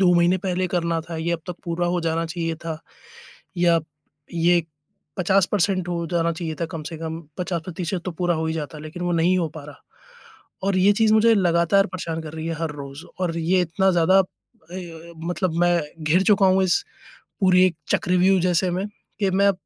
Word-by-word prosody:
2 180 -2 +5
महीने 175 +2 +4
पहले 185 -1 0
करना 170 -2 0
था, 165 +1 -7
ये 165 +2 -1
अब 170 - -2
तक 180 -1 -5
पूरा 175 0 -1
हो 175 0 0
जाना 165 0 -1
चाहिए 165 0 -3
था 160 -1 -4 0.8
या 170 -1 +4 0.6
ये 170 +1 +3 0.6
50% 190 0 +2
हो 170 -1 -2
जाना 170 -1 +1
चाहिए 160 -1 -4
था 170 - 0
कम 160 - -5
से 165 - -6
कम। 160 0 -5 0.2
50% 175 0 -3
तो - - -1
पूरा 175 +1 0
हो 160 0 -1
ही 160 - -1
जाता 150 -1 -5
लेकिन 155 +4 -8
वो 175 - 0
नहीं 170 +2 +3
हो 165 - 0
पा 155 - -7
रहा। 145 -1 -12 0.9
और 195 -1 +1
ये 200 +2 +5
चीज़ 220 +1 +3
मुझे 225 +1 +5
लगातार 180 +1 +3
परेशान 165 -3 -4
कर 155 -1 -8
रही 160 0 -5
है 165 - -2
हर 165 -2 -1
रोज़ 140 +2 -9 0.2
और 170 -2 -1
ये 180 +3 +2
इतना 180 +3 +1
ज़्यादा 175 +3 +4
अ, 195 - +4 1.0
मतलब 175 -1 -1
मैं 175 -1 +3 0.2
घिर 165 +5 +3
चुका 200 0 +4
हूँ 190 0 +4
इस 185 - +2 0.6
पूरी 185 -1 +5
एक 185 - 0 0.2
चक्रव्यूह 185 +1 +3
जैसे 180 +1 +2
में 185 +3 -1 0.3
कि 205 - +1
अब 190 - -1
मैं 200 +1 +4
175 Hz, 200 wpm, -23 LUFS, 165-185 Hz, 1.0 s, 2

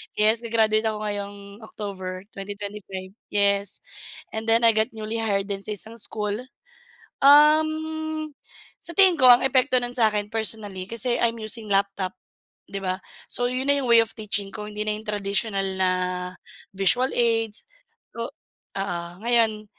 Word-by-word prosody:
Yes, 215 +2 +3
ga-graduate 220 -1 +1
ako 215 -1 -3
ngayong 200 0 -6
October, 190 -4 -6
2025. 200 -1 -7 0.2
Yes. 200 -1 +1 0.5
And 220 0 -5
then 225 +1 +4
I 230 - +7
got 220 0 0
newly 220 +1 -4
hired 200 -2 0
din 195 - -2
sa 210 - -2
isang 225 +4 -3
school, 210 0 -1 0.9
um, 310 +1 +4 0.5
sa 340 - -6
tingin 375 -1 +5
ko 275 - +1
ang 240 - +6
epekto 260 -1 +3
nun 245 +1 -3
sa'kin 210 -3 +2
personally 215 -4 -2
kasi, 230 +4 0
I'm 230 -1 0
using 215 0 0
laptop, 195 -1 0 0.6
'di 200 - -5
ba? 185 0 -1 0.3
So, 245 - 0
yun 260 +2 -2
na 285 - +3
yung 260 - -3
way 230 - +8
of 225 - -10
teaching 205 -2 0
ko 210 -1 -6
hindi 210 0 -4
na 215 - 0
yung 220 +1 -11
traditional 200 0 0 0.2
na 185 -1 +4 0.9
visual 245 +7 +3
aids, 225 -2 +1 0.5
o - - -2
oo, 175 -3 -7 0.2
ngayon 225 -3 +2
215 Hz, 150 wpm, -24 LUFS, 200-235 Hz, 0.9 s, way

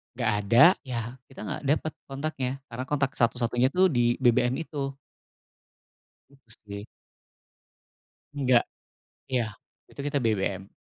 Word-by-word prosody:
nggak - - +1 0.2
ada, 120 +6 +8 0.2
ya, 120 0 -4
kita 135 - -10
nggak - - -4
dapet 155 +2 +1
kontaknya 135 -2 -3 0.2
karena 120 +2 -4
kontak 140 -2 +1
satu-satunya, 120 +1 +2
tuh, 185 +3 +5
di 120 -2 +3
BBM 125 0 +3
itu. 140 -3 -4 1.3
Usti. 110 -6 -11 1.5
Enggak, 130 -4 +3 0.7
ya, 120 -5 0 0.4
itu - - -17
kita 145 +1 -1
BBM. 100 -5 -1
125 Hz, 110 wpm, -27 LUFS, 115-140 Hz, 1.5 s, ada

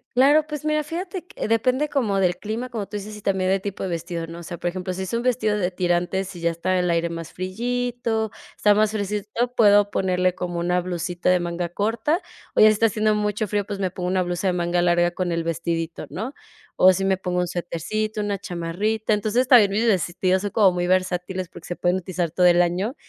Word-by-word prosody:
Claro, 290 +4 +5
pues 300 -1 -6
mira, 305 0 +1
fíjate 355 +4 -5
que - - -5
depende 255 +6 +1
como 220 -9 0
del 180 -2 +2
clima, 220 +6 -4
como 220 -5 -4
tú 210 - -5
dices, 210 +1 -7
y 210 - -11
también 190 -2 +1
del 195 0 +1
tipo 200 0 -5
de 190 - -2
vestido, 170 0 -4
¿no? 165 +1 -9
O - - -9
sea, 175 +1 -7
por 175 - -3
ejemplo, 185 +1 -4
si 190 +1 -4
es 190 - -6
un 230 - 0
vestido 230 -4 +1
de 180 -3 0
tirantes 180 +1 -1
y - - -8
ya 170 - +2
está 180 +3 0
el 180 0 0
aire 170 0 +1
más 165 -1 -7
friito, 230 +3 -2 0.2
está 210 - +4
más 215 0 +2
fresquecito, 210 +3 -2
puedo 205 -2 +5
ponerle 185 -1 +1
como 175 -1 -4
una 180 +1 +1
blusita 175 0 -2
de 180 0 +4
manga 175 0 -3
corta. 225 - 0 0.4
O - - +2
ya, - - +9
si 215 - +6
está 225 +2 +3
haciendo 215 0 +1
mucho 210 +1 -1
frío, 205 +1 0
pues 205 0 -5
me 190 -2 -1
pongo 180 0 -4
una 185 0 +1
blusa 175 +2 -2
de 185 - +2
manga 175 0 0
larga 175 0 +3
con 175 0 -2
el 165 0 -1
vestidito, 165 0 -3
¿no? 225 +9 -5 0.4
O 185 0 +7
si 195 +1 -1
me 190 -1 +2
pongo 180 -1 -2
un 180 - 0
suetercito, 180 +6 -3
una 205 -1 -2
chamarrita. 200 +4 -1
Entonces, 215 +4 +1
también 235 -6 +7
mis 215 +4 +1
vestidos, 185 -2 +1
son 205 - -2
como 205 -4 +5
muy 175 0 -1
versátiles 185 0 0
porque 165 0 -12
se 175 - -4
pueden 175 +1 +1
utilizar 180 -2 -3
todo 180 +2 +4
el 175 0 +5
año, 185 +9 -1
190 Hz, 230 wpm, -23 LUFS, 175-215 Hz, 0.4 s, ya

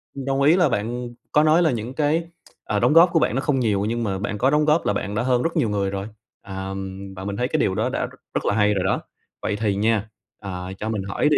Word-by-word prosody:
mình 135 - -5
đồng 135 0 0
ý 150 +4 +6
là 175 -5 +4
bạn 120 +2 -2 0.2
có 150 - +4
nói 155 +2 +5
là 160 -5 +3
những 120 +2 -4
cái, 155 +3 +1 0.4
à, - - 0
đóng 150 - +3
góp 170 +2 +8
của 165 - +5
bạn 120 - +1
nó 135 - +1
không 135 -2 +1
nhiều 105 -4 +1
nhưng 115 +2 -1
mà 95 -3 -2
bạn 105 +1 -3
có 130 +5 +3
đóng 150 +1 +3
góp 155 +2 +3
là - - +2
bạn 100 +1 -3
đã 120 - 0
hơn 125 -1 +2
rất 165 +1 -1
nhiều 130 -8 +2
người 100 -1 0
rồi, 100 +1 -4 0.3
à, 95 0 -6 0.4
và 95 - -7
mình 100 0 -3
thấy 125 - 0
cái - - 0
điều 95 - +1
đó - - 0
đã - - -1
rất - - -12 0.2
rất - - -2
là - - +2
hay 105 -1 +3
rồi 95 -2 0
đó. 95 - 0 0.4
Vậy 105 - -1
thì 105 -2 0
nha, 110 +1 +1 0.3
à, 95 -2 -6
cho 110 - -3
mình 105 -4 -2
hỏi 100 +9 0
đi, 150 - +4
115 Hz, 285 wpm, -23 LUFS, 100-145 Hz, 0.4 s, góp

